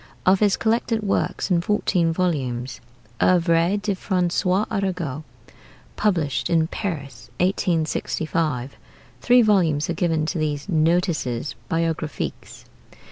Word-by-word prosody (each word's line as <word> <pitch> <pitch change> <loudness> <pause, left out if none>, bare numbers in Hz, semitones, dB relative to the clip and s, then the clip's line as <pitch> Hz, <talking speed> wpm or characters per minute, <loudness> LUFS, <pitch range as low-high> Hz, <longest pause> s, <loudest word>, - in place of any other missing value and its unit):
Of 185 +1 +5
his 205 -2 +3
collected 225 0 0
works 200 0 -1
in 170 -1 +3
fourteen 175 -3 +1
volumes, 135 -8 -2 0.4
'Oeuvres 170 +2 +3
de 205 -1 0
François 185 +1 0
Arago,' 180 - -2 0.7
published 165 -10 0
in 165 -2 +3
Paris, 160 -6 -5
1865, 160 -6 -1 0.4
three 245 0 +5
volumes 170 -8 +2
are - - -1
given 165 -2 0
to 160 - -2
these 150 0 -2
'Notices 160 -6 0 0.2
Biographiques.' 165 -2 -3
170 Hz, 105 wpm, -23 LUFS, 155-190 Hz, 0.7 s, Of